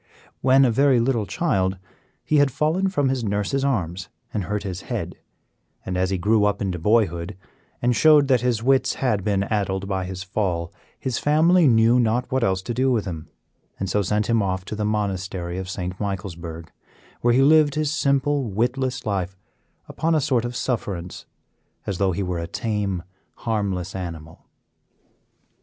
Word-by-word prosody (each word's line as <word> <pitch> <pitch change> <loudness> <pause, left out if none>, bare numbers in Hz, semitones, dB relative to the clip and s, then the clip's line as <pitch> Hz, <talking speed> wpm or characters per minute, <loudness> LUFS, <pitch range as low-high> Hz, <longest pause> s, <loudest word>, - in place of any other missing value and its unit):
When 135 +1 +5
a 120 - +3
very 135 +1 +4
little 115 -4 0
child, 95 - 0 0.5
he 155 - +2
had 145 -1 +5
fallen 155 +8 0
from 145 -8 +1
his 130 -2 -1
nurse's 105 +6 -1
arms 95 -10 -1 0.2
and 100 -4 -2
hurt 105 +1 -2
his 95 -3 -5
head, - - -3 0.7
and 90 - -3
as 90 0 +1
he 95 - 0
grew 105 +4 +2
up 105 0 +1
into 95 -3 -2
boyhood, 95 -2 +1 0.5
and 120 0 +3
showed 150 +1 +6
that 130 -4 +3
his 120 -3 0
wits 135 +1 +2
had 110 -7 0
been 100 -1 +1
addled 100 -2 -1
by 95 -2 -2
his 95 0 -6
fall, 90 -4 -2 0.3
his 130 -3 -2
family 160 +3 +4
knew 115 0 +5
not 120 +1 0
what 130 -1 +1
else 95 -3 0
to 120 - -3
do 130 +2 +1
with 115 -4 0
him, 80 -5 -6 0.5
and 95 -1 -2
so 105 - +2
sent 105 +2 0
him 115 -1 +2
off 95 -1 -2
to 105 - -5
the 105 - -3
Monastery 95 -4 -2
of 95 -1 -6
St. 90 0 -5
Michaelsburg, 85 -5 -5 0.5
where 120 0 +3
he 135 - +5
lived 150 0 +5
his 155 -1 0
simple, 140 -1 +1
witless 125 +4 -1
life 95 -3 -2 0.5
upon 165 +1 0
a - - +3
sort 130 -4 +1
of 120 0 -4
sufferance, 100 -9 -3 0.6
as 95 -3 -3
though 95 -1 +2
he 95 +3 -2
were 90 -2 -2
a 85 - -4
tame, 100 -4 -2 0.3
harmless 95 -5 -2
animal. 80 -3 -7
105 Hz, 175 wpm, -23 LUFS, 95-130 Hz, 0.7 s, showed